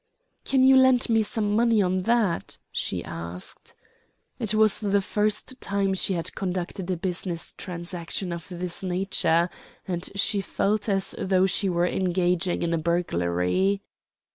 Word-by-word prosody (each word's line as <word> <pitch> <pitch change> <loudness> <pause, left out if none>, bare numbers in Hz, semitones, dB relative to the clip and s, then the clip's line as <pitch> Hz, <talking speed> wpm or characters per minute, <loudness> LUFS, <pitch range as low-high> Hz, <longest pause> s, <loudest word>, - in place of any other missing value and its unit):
"Can 265 -1 +3
you 265 0 +7
lend 260 -2 +5
me 225 0 +4
some 210 -1 0
money 230 -1 +3
on 185 -1 +2
that?" 220 -8 +1
she - - -2
asked. 85 +2 -6 0.6
It 215 -1 0
was 215 -1 +4
the 200 -1 +2
first 210 +5 -1
time 200 -1 0
she 190 +1 0
had 165 0 -3
conducted 185 0 -3
a 185 - 0
business 175 -1 -4
transaction 175 0 -4
of 170 -1 -7
this 180 -1 -4
nature, 180 -2 +1 0.4
and 175 -1 -2
she 200 0 +2
felt 210 +2 -1
as 195 -1 +1
though 190 0 +3
she 195 +1 +1
were 175 -1 +2
engaging 180 -1 0
in 170 0 0
a 165 - +1
burglary. 170 - 0
190 Hz, 145 wpm, -26 LUFS, 175-205 Hz, 0.6 s, you